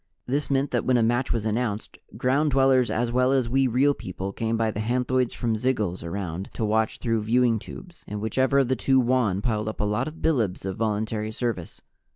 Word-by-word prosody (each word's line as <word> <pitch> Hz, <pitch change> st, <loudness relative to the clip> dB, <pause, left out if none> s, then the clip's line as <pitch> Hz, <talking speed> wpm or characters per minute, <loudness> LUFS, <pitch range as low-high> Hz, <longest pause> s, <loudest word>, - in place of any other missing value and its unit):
This 140 Hz, +2 st, -1 dB
meant 140 Hz, 0 st, +1 dB
that 120 Hz, -, 0 dB
when 130 Hz, -1 st, +3 dB
a 115 Hz, -, +3 dB
match 120 Hz, +3 st, +1 dB
was 115 Hz, -2 st, -1 dB
announced, 110 Hz, -1 st, -2 dB, 0.2 s
Ground 140 Hz, +4 st, +2 dB
Dwellers 135 Hz, -2 st, +3 dB
as 120 Hz, +1 st, 0 dB
well 125 Hz, +1 st, +2 dB
as 130 Hz, -3 st, +2 dB
we 135 Hz, +2 st, +2 dB
Real 130 Hz, +4 st, +3 dB
People 95 Hz, -3 st, -6 dB
came 115 Hz, +2 st, -1 dB
by 110 Hz, -1 st, +1 dB
the 105 Hz, -, -5 dB
hanthoids 125 Hz, +2 st, 0 dB
from 115 Hz, -2 st, -1 dB
zygils 105 Hz, -8 st, -1 dB
around 90 Hz, +1 st, -4 dB
to 110 Hz, -, -1 dB
watch 110 Hz, +1 st, +1 dB
through 115 Hz, -2 st, 0 dB
viewing 115 Hz, +1 st, +2 dB
tubes 175 Hz, -, -11 dB
and 105 Hz, -, -4 dB
whichever 130 Hz, +6 st, +1 dB
of 135 Hz, -2 st, +4 dB
the 130 Hz, -, +1 dB
two 130 Hz, +2 st, +2 dB
won 120 Hz, -6 st, +1 dB
piled 110 Hz, -2 st, -1 dB
up 110 Hz, -, -7 dB
a -, -, 0 dB
lot 105 Hz, +6 st, 0 dB
of 155 Hz, +1 st, -8 dB
bilibs 115 Hz, -, 0 dB
of 95 Hz, -, -3 dB
voluntary 110 Hz, 0 st, -1 dB
service. 110 Hz, -7 st, -4 dB
115 Hz, 210 wpm, -25 LUFS, 105-130 Hz, 0.2 s, of